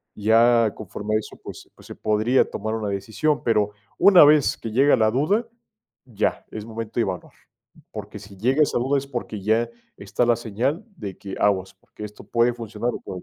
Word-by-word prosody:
ya 115 +1 +4
conforme 105 +1 -4
a - - +3
eso, 110 - -10
pues - - -10
pues - - -17
se - - -9
podría 110 +4 +1
tomar 110 +2 -4
una 110 -2 -3
decisión, 110 +10 -1
pero 105 -3 +1 0.3
una 185 -5 +8
vez 150 -1 +4
que 115 - -6
llega 135 +4 +4
la 110 -2 +2
duda, 195 - +1 0.6
ya, 110 -4 -2
es 105 -1 -7
momento 115 0 -7
de - - +4
evaluar, 95 -4 -5 0.6
porque 105 0 -8
si 100 -1 -13
llega 130 +8 +3
esa 145 - 0
duda 135 +3 +1
es 140 - -9
porque 120 -5 -5
ya 110 +4 +1 0.3
está 100 +5 -1
la 120 -1 +3
señal 120 - -2
de 100 -4 -7
que 100 -1 -8
aguas, 95 -2 +1
porque 95 - -13
esto 105 0 -12
puede 120 +1 +2
funcionar 120 +1 -4
o - - -5
puede 90 -1 -7
110 Hz, 195 wpm, -23 LUFS, 105-125 Hz, 0.6 s, una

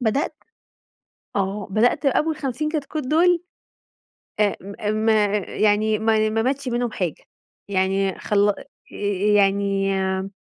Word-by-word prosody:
بدأت 255 +6 0 1.0
آه، 200 0 -2
بدأت 240 +7 +2
أول 305 +4 +2
50 295 +1 -2
كتكوت 300 -1 -3
دول 340 +3 +3 1.0
آآ، 205 -1 +2 0.3
م - - 0
ما 210 -2 +3
يعني 215 +2 +1
ما 220 -1 +2
ماتش 270 +1 -1
منهم 240 -2 -1
حاجة، 175 -5 -3 0.5
يعني 195 0 0
خل 205 0 +2 0.8
يعني 195 0 +2
آآ، 190 0 -2
215 Hz, 110 wpm, -22 LUFS, 195-265 Hz, 1.0 s, دول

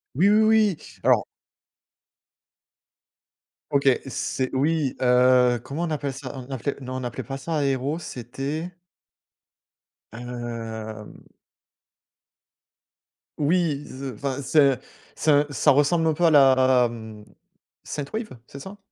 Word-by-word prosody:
Oui, 175 +9 +4
oui, 215 +1 +5
oui, 215 -5 +3 0.3
alors - - +4 2.5
OK, 140 -1 +3 0.2
c'est, 130 0 -3
oui! 145 0 0
Heu, 125 -1 +4
comment 140 +6 -4
on 170 - -2
appelle 145 -3 -3
ça? 135 0 -8
On 125 0 -8
appelait, 135 +2 -3
non, 130 0 -6
on 130 - -5
appelait 120 - -5
pas 135 0 -6
ça 160 +4 -4
Aéro. 140 +1 0
C'était 145 +4 -5 1.4
hem 115 -2 -7 2.2
oui 155 -1 +1
ze 130 0 -7
enfin, 135 +4 -4
c'est 140 -1 +4
un 125 - -8 0.4
c'est 155 - +1
un, 145 0 +4
ça 145 +2 +3
ressemble 145 +4 +3
un 160 - +2
peu 175 +3 +1
à 165 - +5
la, 130 -3 +5
mmh, 110 -2 -10 0.6
synthwave, 210 +10 -5 0.2
c'est 140 - -10
ça? 190 +7 -10
135 Hz, 125 wpm, -24 LUFS, 125-155 Hz, 2.5 s, oui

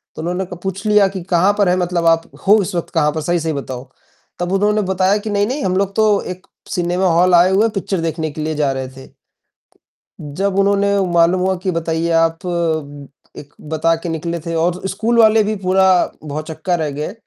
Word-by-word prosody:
तो - - -6
उन्होंने 180 +3 -2
क - - -8
पूछ 195 +2 -4
लिया 210 -2 +5
कि 190 -1 -6
"कहाँ 190 +4 +4
पर 195 -3 +3
है 180 - +2
मतलब 175 -1 -1
आप? 165 0 +2 0.2
हो 210 +1 +6
इस 180 - -5
वक़्त 170 - -3
कहाँ 150 -2 +3
पर 155 - -2
सही-सही 165 -1 -1
बताओ?" 130 -2 -6 0.5
तब 175 +1 -2
उन्होंने 210 +2 +2
बताया 190 +2 +2
कि 210 +1 -6
"नहीं, 205 0 +1
नहीं 275 +3 -3
हम 185 0 0
लोग 195 0 -1
तो 215 -2 +3
एक 185 - -20 0.3
सिनेमा 180 +1 0
हाल 180 0 +4
आए 180 +2 +5
हुए 200 +3 +3
हैं 225 - 0
पिक्चर 190 -1 -2
देखने 160 -1 -3
के 155 - -7
लिए 155 0 -2
जा 145 -2 +1
रहे 130 -1 -5
थे।" 135 - -13 1.1
जब 185 +7 -3
उन्होंने 200 0 +2 0.2
मालूम 170 +2 +3
हुआ 190 0 +1
कि 185 - 0
बताइए 165 0 -2
आप 165 +2 0 0.9
एक 145 0 -12
बता 160 +1 +1
के 170 - -3
निकले 170 +1 -3
थे 165 - -3
और 175 +2 0
स्कूल 225 +5 -1
वाले 220 -1 +5
भी 215 +1 -1
पूरा 190 +1 +3 0.4
भौचक्का 155 +4 -3
रह 150 - -1
गए 165 +6 -4
180 Hz, 210 wpm, -18 LUFS, 165-195 Hz, 1.1 s, हो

